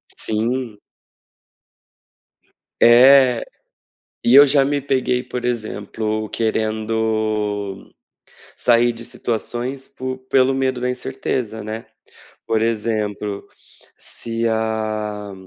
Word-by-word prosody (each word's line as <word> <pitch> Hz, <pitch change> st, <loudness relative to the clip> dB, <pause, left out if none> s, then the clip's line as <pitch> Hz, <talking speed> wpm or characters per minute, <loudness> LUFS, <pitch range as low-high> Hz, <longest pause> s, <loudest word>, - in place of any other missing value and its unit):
Sim. 115 Hz, +1 st, -2 dB, 2.0 s
É, 125 Hz, +1 st, +7 dB, 0.8 s
e 120 Hz, -, +4 dB
eu 145 Hz, +1 st, +10 dB
já 140 Hz, 0 st, +4 dB
me 145 Hz, +1 st, 0 dB
peguei, 130 Hz, -2 st, 0 dB
por 125 Hz, -1 st, -6 dB
exemplo, 110 Hz, -2 st, -3 dB
querendo 110 Hz, -2 st, -2 dB, 0.6 s
sair 120 Hz, 0 st, +3 dB
de 115 Hz, 0 st, -9 dB
situações 120 Hz, +4 st, -4 dB
por 130 Hz, 0 st, -5 dB
pelo 130 Hz, 0 st, +3 dB
medo 130 Hz, -2 st, -1 dB
da 125 Hz, -, 0 dB
incerteza, 125 Hz, -3 st, -3 dB
né. 110 Hz, +2 st, -6 dB, 0.6 s
Por 110 Hz, -1 st, 0 dB
exemplo, 105 Hz, -2 st, -2 dB, 0.5 s
se 115 Hz, 0 st, -5 dB
a 110 Hz, -2 st, -2 dB
115 Hz, 90 wpm, -20 LUFS, 110-125 Hz, 2.0 s, eu